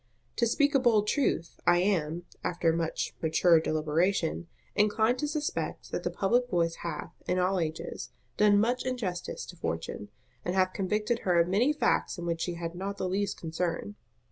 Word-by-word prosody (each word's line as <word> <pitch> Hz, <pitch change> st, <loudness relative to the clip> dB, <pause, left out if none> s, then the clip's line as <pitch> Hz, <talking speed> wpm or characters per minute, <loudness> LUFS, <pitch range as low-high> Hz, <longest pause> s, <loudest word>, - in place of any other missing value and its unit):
To 235 Hz, -, +3 dB
speak 285 Hz, +5 st, +2 dB
a 275 Hz, -, +5 dB
bold 225 Hz, -5 st, +3 dB
truth, 210 Hz, -, 0 dB
I 175 Hz, 0 st, +6 dB
am, 175 Hz, -3 st, 0 dB, 0.2 s
after 170 Hz, -2 st, +1 dB
much 165 Hz, -1 st, -2 dB
mature 165 Hz, +1 st, +4 dB
deliberation, 160 Hz, +3 st, 0 dB, 0.3 s
inclined 220 Hz, +4 st, +3 dB
to 295 Hz, -, 0 dB
suspect 300 Hz, 0 st, -3 dB
that -, -, -2 dB
the -, -, -1 dB
public 240 Hz, +5 st, +1 dB
voice 170 Hz, -4 st, +1 dB
hath, 160 Hz, -3 st, -5 dB
in 180 Hz, -, +1 dB
all 185 Hz, +1 st, +2 dB
ages, 160 Hz, -1 st, -4 dB, 0.3 s
done 205 Hz, -1 st, +5 dB
much 240 Hz, +4 st, +1 dB
injustice 220 Hz, -9 st, -3 dB
to 180 Hz, -, -10 dB
Fortune, 85 Hz, -, -4 dB, 0.3 s
and 180 Hz, -, -2 dB
hath 185 Hz, -1 st, +2 dB
convicted 210 Hz, +4 st, 0 dB
her 175 Hz, -2 st, +2 dB
of 170 Hz, -, +4 dB
many 215 Hz, +10 st, +3 dB
facts 300 Hz, -7 st, +1 dB
in 175 Hz, -, -5 dB
which 170 Hz, -1 st, -1 dB
she 175 Hz, -, -2 dB
had 170 Hz, 0 st, -4 dB
not 195 Hz, +3 st, -4 dB
the 185 Hz, -, -2 dB
least 195 Hz, +2 st, -1 dB
concern. 165 Hz, +4 st, -3 dB
185 Hz, 175 wpm, -29 LUFS, 170-215 Hz, 0.3 s, I